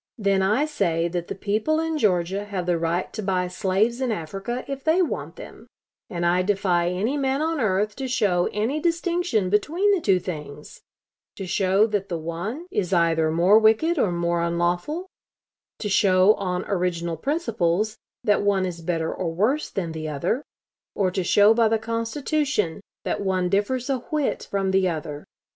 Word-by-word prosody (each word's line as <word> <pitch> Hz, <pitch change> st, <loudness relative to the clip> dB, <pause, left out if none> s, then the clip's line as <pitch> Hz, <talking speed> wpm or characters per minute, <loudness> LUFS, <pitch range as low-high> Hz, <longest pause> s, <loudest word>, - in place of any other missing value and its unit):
Then 200 Hz, -3 st, +2 dB
I 215 Hz, +10 st, +2 dB
say 170 Hz, -, 0 dB
that 175 Hz, 0 st, -3 dB
the -, -, -5 dB
people 215 Hz, +11 st, 0 dB
in 325 Hz, -1 st, -1 dB
Georgia 195 Hz, -2 st, +1 dB
have 195 Hz, -4 st, -4 dB
the 175 Hz, -2 st, +1 dB
right 170 Hz, +2 st, -1 dB
to 215 Hz, -, -4 dB
buy 185 Hz, -2 st, 0 dB
slaves 200 Hz, +6 st, 0 dB
in 255 Hz, -3 st, 0 dB
Africa 195 Hz, +7 st, -4 dB
if 275 Hz, -1 st, -5 dB
they 325 Hz, +4 st, +3 dB
want 335 Hz, -, -4 dB
them, -, -, -12 dB, 0.4 s
and 175 Hz, -1 st, -2 dB
I 175 Hz, +1 st, +3 dB
defy 185 Hz, -3 st, +1 dB
any 210 Hz, +10 st, -1 dB
man 270 Hz, 0 st, 0 dB
on 320 Hz, 0 st, -1 dB
earth 210 Hz, 0 st, +1 dB
to 265 Hz, -1 st, -3 dB
show 200 Hz, -8 st, +1 dB
any 225 Hz, +9 st, -1 dB
distinction 335 Hz, -, 0 dB
between 330 Hz, -, +2 dB
the 390 Hz, -4 st, +2 dB
two 195 Hz, -8 st, +3 dB
things 150 Hz, -4 st, -8 dB, 0.5 s
to 195 Hz, -, -6 dB
show 190 Hz, +3 st, +2 dB
that 205 Hz, -3 st, -2 dB
the 170 Hz, -, -2 dB
one 175 Hz, -, -5 dB
is 185 Hz, -, -1 dB
either 165 Hz, -2 st, +3 dB
more 175 Hz, +7 st, +5 dB
wicked 225 Hz, +10 st, +3 dB
or 195 Hz, -, +2 dB
more 170 Hz, 0 st, 0 dB
unlawful; 175 Hz, -, -1 dB, 0.7 s
to 210 Hz, -, -4 dB
show 195 Hz, 0 st, +5 dB
on 185 Hz, -2 st, -3 dB
original 175 Hz, -3 st, -1 dB
principles, 215 Hz, -, -1 dB, 0.2 s
that 205 Hz, -1 st, +3 dB
one 200 Hz, -2 st, +2 dB
is 170 Hz, -2 st, -5 dB
better 165 Hz, -1 st, -1 dB
or 170 Hz, -3 st, -3 dB
worse 220 Hz, -, 0 dB
than 175 Hz, -4 st, -3 dB
the 155 Hz, -1 st, -5 dB
other; 175 Hz, -, -1 dB, 0.5 s
or 190 Hz, -3 st, +1 dB
to 185 Hz, 0 st, -1 dB
show 205 Hz, +4 st, +5 dB
by 230 Hz, 0 st, +3 dB
the 225 Hz, +1 st, +2 dB
Constitution, 230 Hz, -, -1 dB, 0.2 s
that -, -, -1 dB
one 185 Hz, -2 st, 0 dB
differs 210 Hz, +6 st, 0 dB
a 270 Hz, -2 st, 0 dB
whit 295 Hz, +3 st, -2 dB
from 195 Hz, -1 st, 0 dB
the 190 Hz, -1 st, +3 dB
other. 155 Hz, -3 st, -5 dB
195 Hz, 175 wpm, -24 LUFS, 175-240 Hz, 0.7 s, more